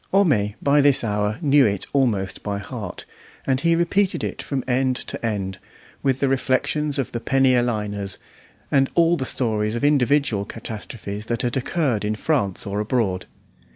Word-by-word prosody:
Homais 130 - +3
by 145 +1 +4
this 140 -3 +4
hour 105 0 0
knew 140 -3 +5
it 100 -2 -2
almost 110 -9 +1
by 100 -1 -3
heart, 100 -2 -7 0.4
and 135 0 +1
he 170 +1 +3
repeated 185 +3 +1
it - - -3
from 135 -3 -3
end 130 0 +1
to - - -5
end, 100 -4 -2 0.4
with 135 -1 +1
the 140 - +3
reflections 135 +3 0
of 135 - -2
the 120 - -3
penny 135 +1 +3
a 125 - +4
liners, 105 -4 -2 0.5
and 135 -1 +3
all 170 0 +4
the 130 - -3
stories 110 -3 -1
of 120 - -3
individual 140 -6 +3
catastrophes 105 -1 -7
that 120 -1 -1
had 120 -1 -1
occurred 135 -4 0
in 105 +1 -1
France 105 - 0
or 100 0 -2
abroad. 105 -4 -1
125 Hz, 170 wpm, -22 LUFS, 105-140 Hz, 0.5 s, knew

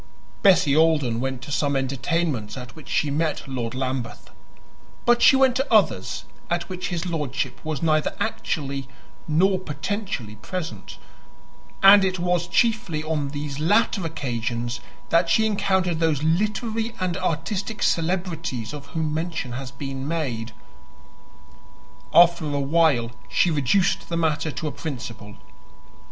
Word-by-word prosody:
Bessie 180 -8 +5
Alden 150 -7 +3
went 130 0 -3
to 145 - -8
some 145 -1 +1
entertainments 135 -3 -1
at 125 -1 -9
which 155 - -12
she 150 - +1
met 155 0 -1
Lord 125 -3 -4
Lambeth; 130 -2 -4 0.7
but 240 0 +4
she 270 - +7
went 265 -2 +4
to 270 - -2
others - - +2 0.2
at 175 0 -1
which 185 -1 -4
his 175 0 -3
lordship 145 -6 -3
was 155 -2 -3
neither 155 -2 +2
actually 140 - -2 0.4
nor 185 +5 +3
potentially 150 - -4
present; 170 - -6 0.9
and 195 +1 +9
it 190 -1 0
was 175 -1 0
chiefly 220 -9 +1
on 155 -2 -1
these 145 0 -5
latter 200 +4 +2
occasions 120 -5 -3 0.3
that 170 0 +3
she 220 +5 +4
encountered 190 -5 +1
those 155 -3 +1
literary 215 +7 0
and 185 -2 -1
artistic 195 +5 -2
celebrities 165 - -1
of 145 -1 -8
whom 155 0 -2
mention 160 -5 -3
has 130 +1 -5
been 135 -1 -6
made. 125 -9 -2 1.6
After 170 -1 +6
a 145 -1 -1
while 140 -5 +2 0.2
she 165 - +3
reduced 175 +7 +1
the 170 - -1
matter 160 -1 0
to 155 +1 -4
a - - -2
principle. 125 -8 -7
160 Hz, 135 wpm, -24 LUFS, 135-180 Hz, 1.6 s, and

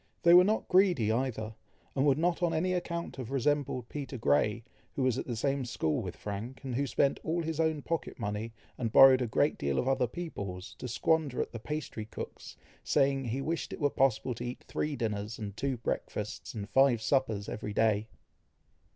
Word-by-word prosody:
They 170 0 +7
were 180 +1 +9
not 215 +4 0
greedy 180 - +4
either, 115 -2 -2 0.4
and 135 +2 +2
would 140 -1 +4
not 170 +2 +1
on 170 -2 +1
any 185 +3 +1
account 170 -3 -3
have 125 -3 -5
resembled 135 -2 0
Peter 140 -1 -5
Grey, 105 +6 +2 0.3
who 135 - 0
was 130 -3 +2
at - - -5
the 120 - -2
same 135 +3 0
school 80 -10 -1
with - - -5
Frank, 105 +7 -6
and 130 -2 -4
who 140 +3 0
spent 140 +1 +1
all 170 +1 -1
his 160 -1 -3
own 160 -3 +1
pocket 165 -3 -3
money, 105 0 -3 0.3
and 115 -3 -1
borrowed 130 +1 +8
a 125 - 0
great 145 +7 +1
deal 70 -1 0
of 125 - 0
other 135 -2 +2
people's, 100 - -6
to - - -5
squander 145 +2 +1
at - - -1
the 115 - -6
pastry 150 -5 -5
cook's, 110 - -8 0.3
saying, 135 -1 +2
he 125 +4 -2
wished 165 +3 -2
it - - -7
were 145 -3 +2
possible 130 -1 +1
to 120 - -7
eat 125 +1 -6
three 150 -1 -2
dinners, 105 -3 -3
and 100 -2 -6
two 135 +2 -1
breakfasts, 115 - -4
and 100 -2 -4
five 135 -3 +5
suppers 110 -3 0
every 105 - -5
day. 110 0 +2
130 Hz, 200 wpm, -31 LUFS, 110-150 Hz, 0.4 s, were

